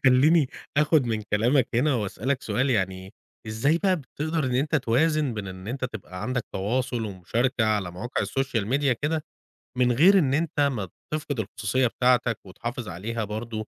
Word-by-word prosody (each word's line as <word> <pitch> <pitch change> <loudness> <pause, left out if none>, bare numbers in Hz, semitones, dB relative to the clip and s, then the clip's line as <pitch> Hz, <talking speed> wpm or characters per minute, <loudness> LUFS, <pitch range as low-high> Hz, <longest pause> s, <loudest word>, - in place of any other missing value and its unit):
خلّيني 140 +3 +5 0.3
آخد 150 -2 +4
من 110 -2 -1
كلامَك 115 +5 +2
هنا 135 +4 +3
وأسألَك 120 +5 -2
سؤال، 130 +2 0
يعني 95 -2 -1 0.3
إزاي 140 +10 +1
بقى 190 -1 +2
بتقدر 155 +2 -3
إن 125 -1 -1
أنتَ 150 +4 +2
توازن 140 +1 +1
بين 105 -2 -4
إن 95 +2 -8
أنتَ 130 +1 -3
تبقى 95 -6 -7
عندَك 125 -2 -1
تواصل 115 +3 -1
ومشاركة 110 +5 0
على 105 -5 0
مواقع 115 +9 -3
السوشيال 130 -6 -1
ميديا 135 +2 +2
كده، 150 +5 -2 0.5
من 125 -1 +4
غير 185 +10 +6
إن 135 -5 +2
أنتَ 155 -1 0
ما 125 -9 +1 0.3
تفقد 145 -5 -2
الخصوصيّة 110 +5 0
بتاعتَك، 125 -1 +2
وتحافظ 120 +5 -6
عليها 110 +6 -3
برضو 110 +1 -5
125 Hz, 160 wpm, -26 LUFS, 110-140 Hz, 0.5 s, غير